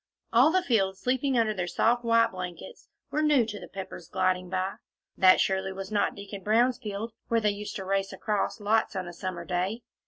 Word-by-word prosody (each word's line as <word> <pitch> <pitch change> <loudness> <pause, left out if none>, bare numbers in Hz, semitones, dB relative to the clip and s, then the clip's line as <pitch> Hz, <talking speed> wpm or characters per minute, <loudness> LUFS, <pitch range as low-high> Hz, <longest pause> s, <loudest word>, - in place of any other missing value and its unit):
All 255 +7 +6
the 370 +1 +2
fields 195 - +1
sleeping 260 +2 0
under 225 -2 +2
their 180 -3 -3
soft, 240 +6 +2
white 230 0 +4
blankets, 185 - -8 0.2
were 305 - 0
new 295 -6 +4
to 210 -2 -6
the - - -9
Peppers 190 -3 -8
gliding 185 -1 0
by. 185 +1 -2 0.4
That 185 -1 +6
surely 190 0 +1
was 195 +1 -7
not 205 -1 +1
Deacon 200 0 -8
Brown's 235 +5 +2
field, 220 0 -5
where 230 - +2
they 210 -2 +2
used 205 +1 -6
to 190 - -5
race 195 0 0
across 210 +1 -2
lots, 215 +2 +1
on 185 -1 -3
a 175 - -7
summer 175 0 -5
day! 185 +6 -2
205 Hz, 205 wpm, -28 LUFS, 190-230 Hz, 0.4 s, All